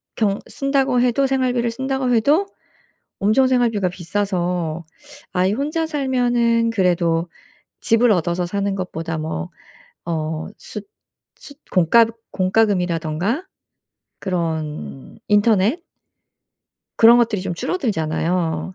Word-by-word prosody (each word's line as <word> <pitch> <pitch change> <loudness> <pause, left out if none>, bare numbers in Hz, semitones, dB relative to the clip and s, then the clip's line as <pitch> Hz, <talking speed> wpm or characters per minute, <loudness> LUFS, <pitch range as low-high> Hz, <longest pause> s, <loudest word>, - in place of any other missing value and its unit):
경 205 -2 0
쓴다고 275 -2 +1
해도 250 +2 +2
생활비를 255 -3 0
쓴다고 265 0 -1
해도 290 - +3 0.7
엄청 220 +6 +3
생활비가 230 -7 +1
비싸서 175 -3 -2 0.5
아이 185 +2 +2
혼자 305 +6 -1
살면은 245 -5 +1
그래도 175 -4 +1 0.5
집을 230 0 +4
얻어서 175 -1 0
사는 200 +2 -2
것보다 165 -3 -4
뭐 155 - -4 0.6
어 160 -1 -3
숫 205 -1 -6 0.5
숫 285 - -10
공과그 225 +6 +4 0.2
공과금이라든가 185 - 0 0.7
그런 160 - -4
인터넷 210 - +3 1.2
그런 235 +1 +7
것들이 225 -5 +1
좀 180 -3 -3
줄어들잖아요. 175 - -1
205 Hz, 240 characters per minute, -20 LUFS, 175-245 Hz, 1.2 s, 그런